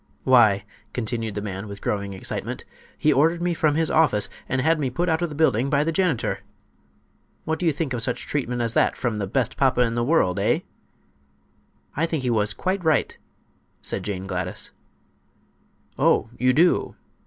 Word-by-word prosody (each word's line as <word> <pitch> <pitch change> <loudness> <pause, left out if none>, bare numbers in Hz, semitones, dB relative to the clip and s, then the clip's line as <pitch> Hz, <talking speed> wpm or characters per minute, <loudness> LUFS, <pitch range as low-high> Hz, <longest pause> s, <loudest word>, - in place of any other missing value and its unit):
"Why," 110 -6 +5 0.3
continued 115 -2 -3
the 105 - -3
man, 100 0 -5
with 100 0 -8
growing 100 -1 -2
excitement, 95 - -5 0.3
"he 150 - +3
ordered 160 +5 +3
me 175 0 0
from 155 -2 +1
his 160 0 +1
office, 140 -10 +3 0.2
and 130 - 0
had 160 +4 +2
me 135 -3 0
put 170 +8 -1
out 160 +1 +1
of 175 - 0
the 150 - -7
building 135 -4 +2
by 145 0 +2
the 165 - 0
janitor! 165 - 0 1.1
What 160 0 -1
do 175 - 0
you - - +5
think 145 -2 -3
of 120 - -2
such 125 +1 -2
treatment 125 -4 -2
as 115 -1 -1
that - - +2
from 120 -4 -1
the 100 -2 -2
'best 125 +4 -1
papa 130 -2 +3
in 115 -2 +2
the 120 0 0
world,' 120 - +2
eh?" - - +2 1.3
"I 160 +4 +1
think 160 -5 -2
he 125 - +1
was 105 -2 +1
quite 185 0 -1
right," 155 -3 +2 0.7
said - - -2
Jane 95 -2 -4
Gladys. 90 -2 -4 1.3
"Oh, 115 - +3
you 125 +1 +3
do? 165 +7 +2
130 Hz, 185 wpm, -24 LUFS, 110-160 Hz, 1.3 s, Why